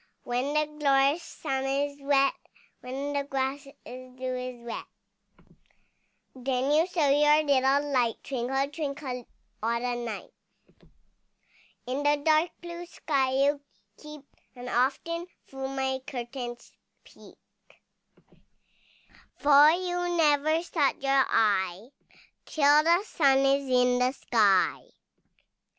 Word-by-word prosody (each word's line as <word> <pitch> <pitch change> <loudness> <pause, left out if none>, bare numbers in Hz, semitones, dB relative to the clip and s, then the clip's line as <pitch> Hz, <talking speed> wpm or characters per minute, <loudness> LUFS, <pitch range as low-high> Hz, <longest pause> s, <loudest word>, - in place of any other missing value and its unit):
When 255 +4 -2
the 305 0 +2
glorious 280 +2 +3
sun 270 -5 -4
is 285 +1 -2
set, 275 -1 +2 0.5
When 270 +3 -5
the 285 0 -1
grass 275 0 -3 0.2
with 255 0 -11
dew 255 0 -3
is 250 -1 -6
wet, 235 - -6 1.5
Then 260 +1 -1
you 315 +4 +3
show 340 -5 0
your 295 +2 +4
little 280 0 +2
light, 240 -3 +2
Twinkle, 270 +1 -2
twinkle 280 -5 -5 0.3
all 230 +2 0
the 245 0 -2
night. 225 -3 -6 1.5
In 255 +3 -3
the 290 0 +2
dark 315 +2 +3
blue 345 0 -8
sky 270 -6 -1
you 285 0 +1 0.3
keep, 300 -2 -12 0.3
And 250 0 -8
often 335 +7 -1 0.2
through 270 0 -6
my 265 -1 -2
curtains 240 -1 -7 0.3
peep, - - -17 2.0
For 290 +1 +6
you 355 0 -1
never 310 +1 +2
shut 310 -5 0
your 275 -1 +3
eye, 200 -1 0 0.6
Till 295 0 +4
the 340 +4 +3
sun 280 -10 +2
is 275 0 +1
in 250 0 +3
the 250 +1 +1
sky. 210 -8 +2
275 Hz, 115 wpm, -27 LUFS, 255-295 Hz, 2.0 s, For